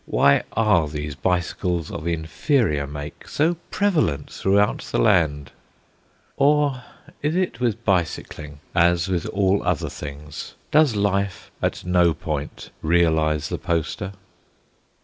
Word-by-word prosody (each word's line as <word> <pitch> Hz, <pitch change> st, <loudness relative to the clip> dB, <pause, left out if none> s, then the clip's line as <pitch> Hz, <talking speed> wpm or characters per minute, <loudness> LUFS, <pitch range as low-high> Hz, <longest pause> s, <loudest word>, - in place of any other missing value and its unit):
Why 70 Hz, 0 st, +4 dB
are 105 Hz, -8 st, +3 dB
these 75 Hz, 0 st, -5 dB
bicycles 85 Hz, +2 st, -1 dB
of 80 Hz, -, -5 dB
inferior 80 Hz, -, 0 dB
make 75 Hz, +1 st, -8 dB
so 160 Hz, +3 st, +1 dB
prevalent 155 Hz, -, 0 dB
throughout 100 Hz, +1 st, +2 dB
the -, -, -4 dB
land 70 Hz, +3 st, +2 dB, 0.9 s
Or 145 Hz, -2 st, +3 dB, 0.4 s
is 150 Hz, +3 st, 0 dB
it 180 Hz, -10 st, -1 dB
with 115 Hz, -2 st, -1 dB
bicycling 80 Hz, -5 st, -2 dB
as 85 Hz, 0 st, +3 dB
with 90 Hz, -3 st, -1 dB
all 100 Hz, 0 st, +1 dB
other -, -, -1 dB
things: 75 Hz, 0 st, -8 dB, 0.2 s
does 150 Hz, -6 st, +4 dB
Life 100 Hz, -1 st, -1 dB
at -, -, -2 dB
no 90 Hz, -2 st, +3 dB
point 75 Hz, -1 st, -5 dB
realise 80 Hz, -3 st, +2 dB
the -, -, -3 dB
Poster? 85 Hz, +4 st, -2 dB
85 Hz, 120 wpm, -23 LUFS, 75-105 Hz, 0.9 s, Why